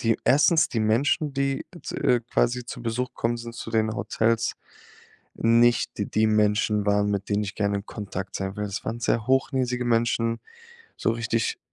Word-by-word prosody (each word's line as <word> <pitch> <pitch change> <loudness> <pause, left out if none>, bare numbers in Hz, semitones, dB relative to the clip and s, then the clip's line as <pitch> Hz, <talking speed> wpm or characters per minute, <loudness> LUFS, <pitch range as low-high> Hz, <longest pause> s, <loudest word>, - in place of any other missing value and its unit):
die 115 -2 +1
erstens 150 +4 +4
die 115 - -2
Menschen, 135 +7 +1
die, 135 0 -1 0.2
z - - -6
äh, 120 -2 +4
quasi 120 0 +1
zu - - -7
Besuch 125 +2 -2
kommen 120 +1 -1
sind 115 0 -8
zu 115 - -7
den 110 -1 +1
Hotels, 115 +1 0 0.8
nicht 120 +1 +3
die 110 +1 +1
Menschen 105 -1 +2
waren, 105 0 +2
mit 100 -1 -2
denen 105 +1 +1
ich 100 - -6
gerne 100 -1 0
in 100 - -9
Kontakt 95 -3 -6
sein 95 +1 -4
will. 105 - -2
Das 100 -1 -5
waren 115 +1 -4
sehr 115 -1 0
hochnäsige 130 -2 +1
Menschen, 115 0 +1 0.6
so - - +1
richtig 115 0 -1
115 Hz, 175 wpm, -25 LUFS, 105-120 Hz, 0.8 s, erstens